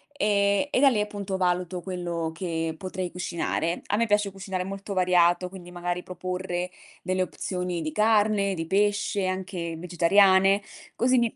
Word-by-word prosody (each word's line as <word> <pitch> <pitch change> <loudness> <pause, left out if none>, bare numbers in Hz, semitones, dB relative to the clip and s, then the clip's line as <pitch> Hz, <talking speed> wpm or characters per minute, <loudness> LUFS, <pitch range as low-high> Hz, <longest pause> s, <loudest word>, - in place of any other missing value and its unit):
e 200 +3 +2
e - - +2
da 280 0 +7
lì 215 -5 +1
appunto 200 -2 -3
valuto 180 -1 0
quello 175 -3 -3
che 165 -2 -2
potrei 185 0 -4
cucinare. 170 -1 -2
A 205 - +1
me 230 - +2
piace 210 -2 +1
cucinare 190 -1 -4
molto 195 +1 -6
variato, 180 -1 +3
quindi 180 -2 -11
magari 175 0 -3
proporre 180 -1 -4 0.3
delle 185 0 0
opzioni 180 -1 -3
di 155 0 -3
carne, 210 -2 +3
di 165 -2 -4
pesce, 205 0 +1
anche 185 -3 -3
vegetariane. 190 +3 +4 0.3
Così 255 +1 +3
mi 235 -2 +1
185 Hz, 155 wpm, -26 LUFS, 175-200 Hz, 0.3 s, da